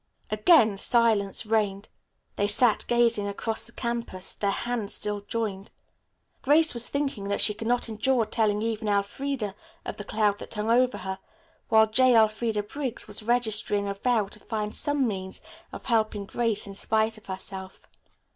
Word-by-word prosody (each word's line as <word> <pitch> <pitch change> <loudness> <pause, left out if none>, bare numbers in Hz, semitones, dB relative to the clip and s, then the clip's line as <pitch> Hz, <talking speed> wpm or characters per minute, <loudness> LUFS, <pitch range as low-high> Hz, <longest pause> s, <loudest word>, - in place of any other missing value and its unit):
Again 215 - +4
silence 220 -2 +2
reigned. 210 -2 0 0.5
They 205 - +1
sat 215 +2 +3
gazing 235 -3 +2
across 220 +3 -3
the - - -12
campus, 235 -7 -4
their 200 - -1
hands 230 0 -1
still 205 -1 -1
joined. 205 -2 -4 0.7
Grace 315 +4 +4
was 240 -1 +1
thinking 280 -8 -2
that 200 - -1
she 210 - +4
could 225 +2 -6
not 245 0 +1
endure 230 +2 +1
telling 210 -1 0
even 225 -1 -2
Elfreda 205 +2 -1 0.3
of - - -5
the 205 - -6
cloud 205 -1 0
that - - -9
hung 210 +2 -1
over 250 +1 +3
her, 190 0 -5 0.5
while 220 -1 +6
J. 245 +3 +3
Elfreda 220 -1 +2
Briggs 260 +3 -4
was 210 +1 -2
registering 215 -3 0
a 200 - -2
vow 220 +1 +1
to 210 +2 -7
find 215 -2 -4
some 290 -3 +2
means 190 -3 -5 0.3
of - - -9
helping 215 -4 0
Grace 230 0 -1
in 200 - -8
spite 220 +2 0
of - - -23
herself. 190 0 -7
220 Hz, 165 wpm, -26 LUFS, 205-235 Hz, 0.7 s, while